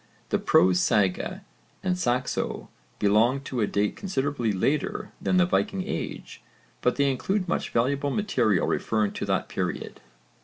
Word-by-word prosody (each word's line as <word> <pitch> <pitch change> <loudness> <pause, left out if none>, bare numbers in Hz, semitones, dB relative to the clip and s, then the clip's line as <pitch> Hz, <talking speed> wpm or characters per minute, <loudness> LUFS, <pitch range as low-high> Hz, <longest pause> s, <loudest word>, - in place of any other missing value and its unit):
The - - +1
prose 90 0 +4
sagas 95 -1 +1 0.4
and 185 -1 +1
Saxo 125 -7 -1 0.3
belong 110 +6 +3
to 130 -4 -3
a 105 - +2
date 100 +1 0
considerably 140 - -1
later 135 +10 -1
than 185 - +1
the 180 - +5
Viking 195 +1 0
age, - - -5 0.4
but 125 - +2
they 140 -1 +2
include 190 +8 -1
much - - -1
valuable 140 +4 +1
material 135 - +1
referring 110 -2 0
to - - -4
that - - 0
period. - - -4
130 Hz, 145 wpm, -26 LUFS, 105-175 Hz, 0.4 s, the